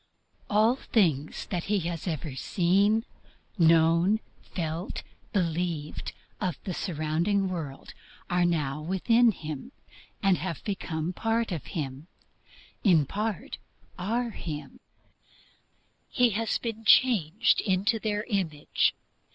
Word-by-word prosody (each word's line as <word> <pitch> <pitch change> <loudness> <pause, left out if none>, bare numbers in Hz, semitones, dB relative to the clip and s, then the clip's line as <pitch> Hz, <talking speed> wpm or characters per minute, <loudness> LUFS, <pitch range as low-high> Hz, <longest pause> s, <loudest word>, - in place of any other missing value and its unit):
All 220 +4 +4
things 160 - +1
that 175 -3 -1
he 205 -1 +1
has 170 +1 -4
ever 155 -4 -3
seen, 200 - +2 0.5
known, 165 +5 +5 0.2
felt, 165 +1 -4 0.3
believed 170 -4 -2 0.3
of 185 -5 -1
the 185 - -3
surrounding 175 +4 0
world 155 -7 -6 0.3
are 180 -1 +2
now 150 -4 0
within 225 +8 +3
him, 155 - -7 0.5
have 185 -4 +1
become 175 -4 -3
part 225 +2 0
of 165 -6 -4
him, 140 +1 -4 0.8
in 170 -8 +5
part 210 +5 -3 0.4
are 230 +6 -1
him 155 -7 -7 1.3
he 245 -1 +3
has 225 +2 0
been 225 -2 -5
changed 215 -4 +4
into 200 +3 +1
their 210 -1 -1
image. 180 -10 0
180 Hz, 105 wpm, -28 LUFS, 160-210 Hz, 1.3 s, known